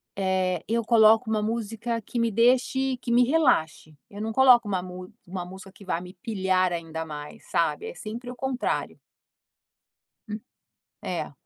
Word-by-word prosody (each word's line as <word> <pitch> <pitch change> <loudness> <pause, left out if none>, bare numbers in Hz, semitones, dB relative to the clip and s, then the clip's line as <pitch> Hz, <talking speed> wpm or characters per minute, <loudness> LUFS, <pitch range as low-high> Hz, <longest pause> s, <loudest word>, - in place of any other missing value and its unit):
eh, 185 -2 0
eu 230 +1 0
coloco 225 0 +5
uma 215 - +1
música 230 +1 -2
que 235 - -4
me 230 0 +2
deixe 255 +3 +2
que 240 -1 -5
me 245 +1 +6
relaxe, 245 - +1
eu 205 +1 -8
não 225 +1 -2
coloco 245 -2 +6
uma 190 -3 -1 0.5
uma 180 0 -4
música 190 +1 -11
que 200 - -16
vá 170 -2 -1
me 180 0 -10
pilhar 190 -6 +1
ainda 165 -1 -4
mais, 150 -1 -9
sabe, 155 -3 0
é - - -7
sempre 230 +7 -7
o - - -9
contrário. 265 0 -2 1.3
Hum, 215 +1 -5 0.6
é. - - -4
215 Hz, 155 wpm, -26 LUFS, 185-235 Hz, 1.3 s, me